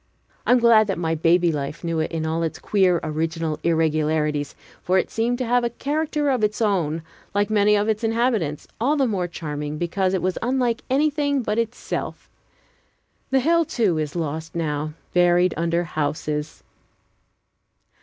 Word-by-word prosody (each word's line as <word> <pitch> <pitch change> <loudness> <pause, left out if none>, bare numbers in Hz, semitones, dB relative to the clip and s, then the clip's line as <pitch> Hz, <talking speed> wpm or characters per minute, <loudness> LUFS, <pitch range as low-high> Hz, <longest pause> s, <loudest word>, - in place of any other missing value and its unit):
I - - +4
am 250 - +7
glad 230 -3 +5
that 195 - -1
my 165 -1 -1
baby 170 +2 +3
life 145 +1 -4
knew 165 -1 -1
it 155 - -1
in 160 -1 -2
all 160 +1 -1
its 165 -1 -2
queer, 185 -4 +2
original 160 0 -2
irregularities, 155 -3 0 0.3
for 185 +1 +1
it - - 0
seemed 235 +2 0
to 255 - -2
have 245 +1 +2
a 235 - +1
character 295 +3 -1
of 250 -4 0
its 210 0 0
own, 170 -8 0 0.3
like 205 +1 +1
many 210 0 +4
of 205 +1 +1
its 220 +1 -1
inhabitants, 225 - 0
all 270 +7 +2
the 275 - +3
more 195 -7 -1
charming 150 -3 -5
because 185 +3 0
it 185 - -1
was 185 0 -1
unlike 245 -1 0
anything 285 0 +1
but 210 +1 -1
itself. 230 +1 -4 1.0
The 265 0 +3
hill, 335 +4 +3
too, 210 - 0
is 150 0 -3
lost 160 0 -4
now, 155 -2 -2 0.2
buried 175 0 +4
under 170 +1 0
houses. 150 -1 -3
180 Hz, 165 wpm, -23 LUFS, 160-230 Hz, 1.0 s, am